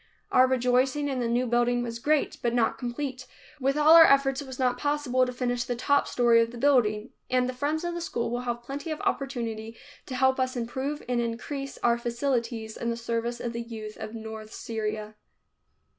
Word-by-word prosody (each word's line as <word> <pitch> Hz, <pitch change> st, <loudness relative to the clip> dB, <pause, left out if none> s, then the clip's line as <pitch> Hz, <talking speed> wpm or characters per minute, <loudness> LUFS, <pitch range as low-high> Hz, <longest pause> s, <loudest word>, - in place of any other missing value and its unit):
Our 255 Hz, 0 st, +6 dB
rejoicing 255 Hz, +3 st, +2 dB
in 265 Hz, -2 st, -2 dB
the 240 Hz, -, 0 dB
new 240 Hz, +2 st, +1 dB
building 240 Hz, 0 st, +2 dB
was 230 Hz, -1 st, -5 dB
great, 295 Hz, +3 st, +1 dB
but 235 Hz, 0 st, 0 dB
not 235 Hz, -2 st, +1 dB
complete. 255 Hz, +1 st, -4 dB, 0.3 s
With 275 Hz, +2 st, +1 dB
all 300 Hz, +2 st, +7 dB
our 330 Hz, 0 st, +11 dB
efforts 275 Hz, -2 st, +4 dB
it 280 Hz, -, -9 dB
was 260 Hz, -1 st, -8 dB
not 250 Hz, -1 st, +1 dB
possible 285 Hz, -4 st, +1 dB
to -, -, -3 dB
finish 245 Hz, -1 st, -1 dB
the 245 Hz, -, -3 dB
top 285 Hz, +4 st, +2 dB
story 235 Hz, -1 st, +4 dB
of 230 Hz, -, 0 dB
the 240 Hz, -, -9 dB
building, 235 Hz, -4 st, +2 dB, 0.2 s
and 250 Hz, 0 st, +2 dB
the 255 Hz, -, -3 dB
friends 295 Hz, +5 st, -1 dB
of 345 Hz, 0 st, -2 dB
the 345 Hz, -, -4 dB
school 235 Hz, -8 st, -2 dB
will 240 Hz, +1 st, -2 dB
have 240 Hz, -1 st, -3 dB
plenty 280 Hz, +6 st, -6 dB
of 310 Hz, -, -3 dB
opportunity 230 Hz, -5 st, -3 dB, 0.3 s
to 255 Hz, -, -5 dB
help 265 Hz, +1 st, +3 dB
us 255 Hz, 0 st, 0 dB
improve 265 Hz, +5 st, -3 dB
and 245 Hz, -1 st, +1 dB
increase 270 Hz, +4 st, -4 dB
our 235 Hz, 0 st, +3 dB
facilities 235 Hz, -2 st, -2 dB
in 235 Hz, -, -2 dB
the 230 Hz, -, -2 dB
service 235 Hz, +1 st, -2 dB
of 240 Hz, -1 st, -4 dB
the 235 Hz, -, -3 dB
youth 220 Hz, -2 st, -7 dB
of 220 Hz, -, -7 dB
north 220 Hz, -1 st, -8 dB
Syria. 215 Hz, -1 st, -4 dB
245 Hz, 205 wpm, -27 LUFS, 235-270 Hz, 0.3 s, our